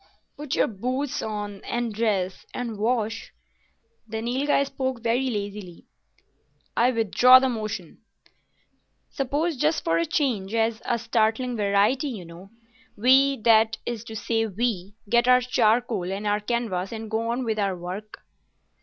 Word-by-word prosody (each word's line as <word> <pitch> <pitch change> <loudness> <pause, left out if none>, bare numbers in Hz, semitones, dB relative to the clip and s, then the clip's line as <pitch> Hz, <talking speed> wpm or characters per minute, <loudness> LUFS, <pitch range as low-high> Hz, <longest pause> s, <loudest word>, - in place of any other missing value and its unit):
"Put 295 -2 -4
our - - +4
boots 255 +6 -3
on,—and 210 +2 -4
dress,—and 215 +2 -2
wash?" 225 0 -1 0.8
The 220 0 -4
Nilghai 270 +4 +1
spoke 260 -3 -4
very 245 +3 +1
lazily. 200 -5 -6 0.9
"I 240 +2 +4
withdraw 245 +2 +6
the 260 0 +2
motion." 215 -7 -5 1.1
"Suppose, 290 +5 -1
just 155 -8 +1
for 165 0 +1
a 170 - 0
change—as 225 -4 0
a 240 - +1
startling 230 +2 0
variety, 210 +7 +2
you 215 -10 -6
know—we, 230 +8 0
that 220 0 +4
is 235 -2 -4
to 220 - -8
say 225 +1 0
we, 205 -2 -2
get 235 +3 +3
our 250 0 +6
charcoal 230 -5 +1
and 200 +2 -4
our 205 0 +1
canvas 210 -4 -2
and 220 -1 -7
go 225 +1 -1
on 245 +2 -1
with 220 -2 -1
our 195 -3 0
work." 185 +5 -7
225 Hz, 135 wpm, -25 LUFS, 205-245 Hz, 1.1 s, withdraw